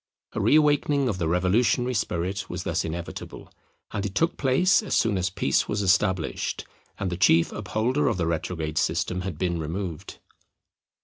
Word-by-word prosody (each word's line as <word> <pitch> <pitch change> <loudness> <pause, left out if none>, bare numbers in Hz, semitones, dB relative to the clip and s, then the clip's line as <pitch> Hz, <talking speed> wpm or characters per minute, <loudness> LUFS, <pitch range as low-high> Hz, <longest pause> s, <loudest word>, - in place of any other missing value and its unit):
A - - -2
re - - +4
awakening 145 -2 +3
of 100 -6 -2
the 85 - 0
revolutionary 105 +8 +2
spirit 95 -2 -2
was - - -4
thus - - -1
inevitable; 85 +1 -7 0.4
and 100 - -3
it 100 0 -4
took 165 +1 +1
place 145 - +3
as 215 - -2
soon 110 -3 +2
as 90 -1 0
peace 70 -7 0
was 105 0 -1
established, 95 -2 0 0.3
and 95 -2 -2
the 90 - -3
chief 85 -2 +4
upholder 125 +7 -1
of - - +1
the 85 - 0
retrograde 80 -1 -2
system 90 +2 -1
had 90 -4 -5
been 85 -1 -1
removed. 85 +1 -5
95 Hz, 170 wpm, -25 LUFS, 85-120 Hz, 0.4 s, re